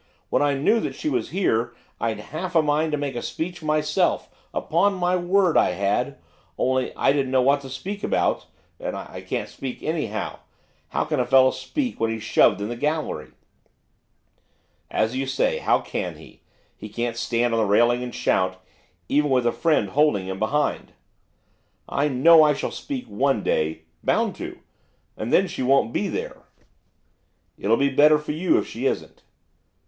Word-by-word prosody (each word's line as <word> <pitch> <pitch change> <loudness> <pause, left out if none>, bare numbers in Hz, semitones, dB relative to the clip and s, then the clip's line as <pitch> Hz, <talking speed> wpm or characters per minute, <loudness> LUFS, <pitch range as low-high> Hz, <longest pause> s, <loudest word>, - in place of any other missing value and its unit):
When - - +2
I 145 -1 +2
knew 150 +12 +3
that - - -4
she 310 - -2
was - - -1
there, 120 - 0 0.3
I'd 115 -2 -1
half 170 +10 -6
a 160 - +5
mind 150 +1 +1
to 150 - 0
make 145 -2 -3
a 120 - -3
speech 175 +1 -5
myself, 155 -1 0 0.2
upon 195 +5 +1
my 180 0 +1
word 180 0 +2
I - - +4
had, 100 +1 -1 0.4
only 130 0 0
I - - +3
didn't 140 -2 0
know 130 -1 +3
what 140 +2 +3
to 135 - -9
speak 195 +10 -6
about, - - 0 0.3
and - - -4
I - - -8
can't - - -3
speak 130 -2 -7
anyhow, 160 -1 -3 0.5
how - - 0
can 150 -2 -1
a 125 - +2
fellow 130 0 +6
speak 275 -5 -3
when 115 - +1
he's 110 -1 -4
shoved - - +3
into 105 +4 -3
the 120 - -11
gallery?' 155 +1 -2 1.6
'As 110 +3 0
you 135 +1 -2
say, 135 0 0
how - - +2
can - - -4
he? - - -16 0.3
he 105 - -9
can't 120 +2 -3
stand 120 0 0
on 115 - +2
the 110 - +2
railing 120 +4 +3
and 125 -1 -6
shout, 95 0 0 0.5
even 150 +1 +2
with 130 -2 +2
a 120 - +3
friend 155 - +1
holding 140 -7 +2
him 95 0 -5
behind.' 145 +7 -1 1.0
'I 145 +1 +1
know 155 +5 +6
I 150 -1 +4
shall - - -3
speak 270 -3 -5
one 130 +1 0
day, 80 +1 0 0.2
bound - - +1
to; - - -7 0.5
and 110 - -4
then 195 - +5
she 175 - -5
won't 130 -2 +2
be - - 0
there.' - - -5 1.1
'It'll 115 +3 +2
be 140 0 +2
better 150 +3 +5
for 150 0 -5
you 185 - +2
if - - 0
she - - -3
isn't. - - -4
140 Hz, 180 wpm, -24 LUFS, 120-160 Hz, 1.6 s, fellow